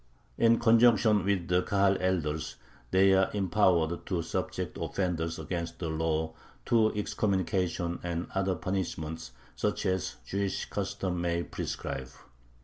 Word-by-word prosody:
In 115 Hz, 0 st, +5 dB
conjunction 115 Hz, -3 st, +5 dB
with 95 Hz, -3 st, 0 dB
the 90 Hz, 0 st, +3 dB
Kahal 100 Hz, 0 st, +2 dB
elders 80 Hz, -5 st, -1 dB, 0.3 s
they 95 Hz, +1 st, +5 dB
are 95 Hz, 0 st, +4 dB
empowered 90 Hz, -4 st, +2 dB
to 90 Hz, -4 st, -1 dB
subject -, -, -3 dB
offenders 85 Hz, -4 st, -1 dB
against 85 Hz, +1 st, -4 dB
the 85 Hz, -, -3 dB
law 80 Hz, 0 st, -1 dB, 0.3 s
to 110 Hz, -2 st, +4 dB
excommunication 95 Hz, -4 st, -1 dB
and 85 Hz, 0 st, -3 dB
other 95 Hz, -1 st, +1 dB
punishments, 85 Hz, -3 st, -3 dB, 0.2 s
such -, -, -1 dB
as 95 Hz, -1 st, -1 dB
the 100 Hz, -, -3 dB
Jewish 100 Hz, -1 st, -1 dB
customs 90 Hz, -2 st, -2 dB
may 85 Hz, 0 st, 0 dB
prescribe. 65 Hz, -5 st, -4 dB
90 Hz, 130 wpm, -29 LUFS, 85-100 Hz, 0.3 s, In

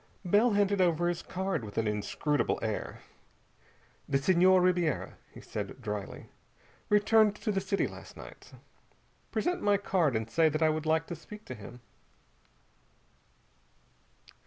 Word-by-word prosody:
Bell 210 Hz, +6 st, +4 dB
handed 200 Hz, -1 st, +2 dB
over 175 Hz, -1 st, +2 dB
his 175 Hz, -, -3 dB
card 190 Hz, -7 st, -3 dB
with 105 Hz, -2 st, -9 dB
an 115 Hz, -1 st, +1 dB
inscrutable 105 Hz, +8 st, -1 dB
air. 110 Hz, -2 st, -4 dB, 1.1 s
"The 135 Hz, -, +3 dB
Senhor 185 Hz, +5 st, +4 dB
Ribiera," 180 Hz, -3 st, 0 dB, 0.2 s
he -, -, -12 dB
said 105 Hz, +3 st, -6 dB
drily, 105 Hz, -4 st, -6 dB, 0.6 s
"returned 210 Hz, 0 st, +4 dB
to 215 Hz, -, -2 dB
the 195 Hz, -1 st, 0 dB
city 195 Hz, +1 st, 0 dB
last -, -, -10 dB
night. -, -, -12 dB, 0.8 s
Present 355 Hz, 0 st, -1 dB
my 205 Hz, -1 st, +3 dB
card 175 Hz, -, +1 dB
and 110 Hz, 0 st, -1 dB
say 160 Hz, +7 st, +3 dB
that 155 Hz, +2 st, -1 dB
I 160 Hz, -, +5 dB
would 155 Hz, 0 st, -2 dB
like 160 Hz, +1 st, +2 dB
to 170 Hz, -, -6 dB
speak 210 Hz, +5 st, -12 dB
to -, -, -7 dB
him." 120 Hz, +2 st, -11 dB
170 Hz, 140 wpm, -30 LUFS, 130-195 Hz, 1.1 s, I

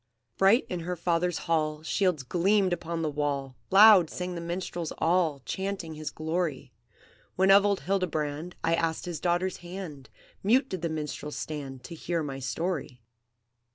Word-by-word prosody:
"Bright 195 Hz, +6 st, +4 dB
in 180 Hz, -, -3 dB
her 180 Hz, +2 st, -3 dB
father's 170 Hz, 0 st, 0 dB
hall 155 Hz, -2 st, 0 dB
Shields 180 Hz, -3 st, +1 dB
gleamed 185 Hz, +6 st, +2 dB
upon 170 Hz, -1 st, -3 dB
the -, -, 0 dB
wall, 140 Hz, -3 st, -2 dB
Loud 195 Hz, -4 st, +8 dB
sang 180 Hz, 0 st, -4 dB
the 170 Hz, -, -5 dB
minstrels 170 Hz, -1 st, -4 dB
all, 165 Hz, -4 st, +1 dB
Chanting 190 Hz, -4 st, -3 dB
his 155 Hz, 0 st, -5 dB
glory; 160 Hz, -5 st, -3 dB, 0.6 s
When 190 Hz, +1 st, +4 dB
of 200 Hz, +1 st, +7 dB
old 200 Hz, -1 st, 0 dB
Hildebrand 160 Hz, -2 st, -2 dB
I 165 Hz, 0 st, +2 dB
asked 165 Hz, -1 st, 0 dB
his 175 Hz, -4 st, -4 dB
daughter's 180 Hz, +2 st, 0 dB
hand, 175 Hz, -6 st, -8 dB, 0.3 s
Mute 250 Hz, +7 st, +3 dB
did 185 Hz, -3 st, -4 dB
the 170 Hz, -, -1 dB
minstrels 150 Hz, -2 st, -4 dB
stand 135 Hz, -2 st, -6 dB
To 145 Hz, -, -8 dB
hear 165 Hz, 0 st, -2 dB
my 135 Hz, -2 st, -5 dB
story. 145 Hz, -1 st, -3 dB
170 Hz, 155 wpm, -28 LUFS, 150-185 Hz, 0.6 s, Loud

